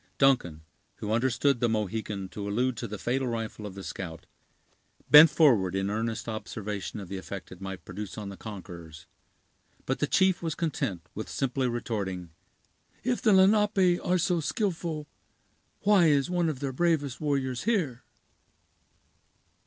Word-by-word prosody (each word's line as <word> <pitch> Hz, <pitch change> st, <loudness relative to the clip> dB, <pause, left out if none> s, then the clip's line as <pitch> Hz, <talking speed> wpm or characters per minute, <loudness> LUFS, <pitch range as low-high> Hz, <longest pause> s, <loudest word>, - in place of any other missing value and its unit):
Duncan, 110 Hz, -, +2 dB, 0.3 s
who 105 Hz, -2 st, -5 dB
understood 125 Hz, +3 st, +2 dB
the 120 Hz, -, +2 dB
Mohican 105 Hz, -2 st, -2 dB
to 100 Hz, +3 st, -5 dB
allude 125 Hz, +4 st, +1 dB
to -, -, -4 dB
the 105 Hz, -, -6 dB
fatal 130 Hz, +5 st, -1 dB
rifle 115 Hz, -2 st, -4 dB
of 95 Hz, -, -10 dB
the 100 Hz, -, -7 dB
scout, 85 Hz, -5 st, -7 dB, 0.9 s
bent 150 Hz, +2 st, +11 dB
forward 105 Hz, -, +4 dB
in 95 Hz, +1 st, 0 dB
earnest 115 Hz, +2 st, -2 dB
observation 105 Hz, -2 st, -5 dB
of 100 Hz, -, -7 dB
the 95 Hz, +2 st, -5 dB
effect 95 Hz, 0 st, -8 dB
it 90 Hz, 0 st, -11 dB
might 95 Hz, -1 st, -6 dB
produce 95 Hz, +1 st, -7 dB
on 105 Hz, -2 st, -5 dB
the 100 Hz, -, -7 dB
conquerors; 85 Hz, -7 st, -9 dB, 0.8 s
but 130 Hz, -, -1 dB
the 145 Hz, -, +1 dB
chief 190 Hz, +3 st, +3 dB
was 165 Hz, -2 st, -2 dB
content 130 Hz, -, -2 dB
with 110 Hz, -, -6 dB
simply 135 Hz, -1 st, -1 dB
retorting: 100 Hz, -7 st, -3 dB, 0.7 s
"If 250 Hz, -1 st, 0 dB
the 220 Hz, -, +4 dB
Lenape 195 Hz, -2 st, +4 dB
are 180 Hz, +1 st, +2 dB
so 175 Hz, 0 st, +1 dB
skillful, 165 Hz, -4 st, -2 dB, 0.7 s
why 195 Hz, -4 st, +5 dB
is 145 Hz, +2 st, +2 dB
one 175 Hz, -2 st, +1 dB
of 145 Hz, -3 st, -5 dB
their 135 Hz, -2 st, -2 dB
bravest 150 Hz, -3 st, 0 dB
warriors 135 Hz, -4 st, -1 dB
here?" 165 Hz, -, 0 dB
120 Hz, 155 wpm, -28 LUFS, 100-155 Hz, 0.9 s, bent